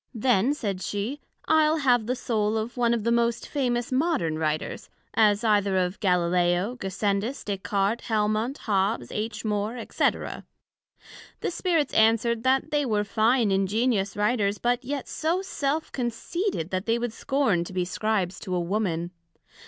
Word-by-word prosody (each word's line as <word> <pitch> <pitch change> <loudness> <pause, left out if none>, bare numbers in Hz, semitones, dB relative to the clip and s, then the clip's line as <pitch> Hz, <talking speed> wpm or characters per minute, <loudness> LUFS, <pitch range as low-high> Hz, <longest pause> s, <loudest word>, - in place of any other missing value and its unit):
Then, 245 +3 +2
said 200 -9 -3
she, 210 +10 -3 0.2
I'le 315 0 +4
have 245 -6 +2
the 250 - 0
Soul 220 -3 0
of 220 +2 -3
one 240 -2 +2
of 235 -3 0
the 235 - +1
most 235 0 +1
famous 245 -4 -1
modern 260 - +1
Writers, 155 -1 -2 0.2
as 210 0 +3
either 205 -3 +2
of 180 +1 -1
Galileo, 180 +1 +2
Gassendus, 200 +4 -2
Des 200 -2 -3
Cartes, 200 +3 -1
Helmont, 215 +4 0
Hobbes, 195 - 0
H. 220 +2 -4
More, 210 +2 -1
&c. - - +3 1.3
The - - -1
Spirits 335 -5 0
answered, 225 +1 +3
That 260 +2 +1
they 295 -1 +2
were 215 -5 +1
fine 220 +2 +2
ingenious 200 +1 +1
Writers, 210 -1 +1
but 245 +3 0
yet 275 +1 -4
so 340 +4 -1
self 305 -4 -2
conceited, 245 - -2
that 185 +3 -2
they 230 +1 +2
would 240 -1 -3
scorn 245 -11 +1
to - - -8
be 180 -1 -1
Scribes 195 -1 -1
to 185 -3 -4
a - - +1
Woman. 175 -2 -1
220 Hz, 155 wpm, -26 LUFS, 195-250 Hz, 1.3 s, I'le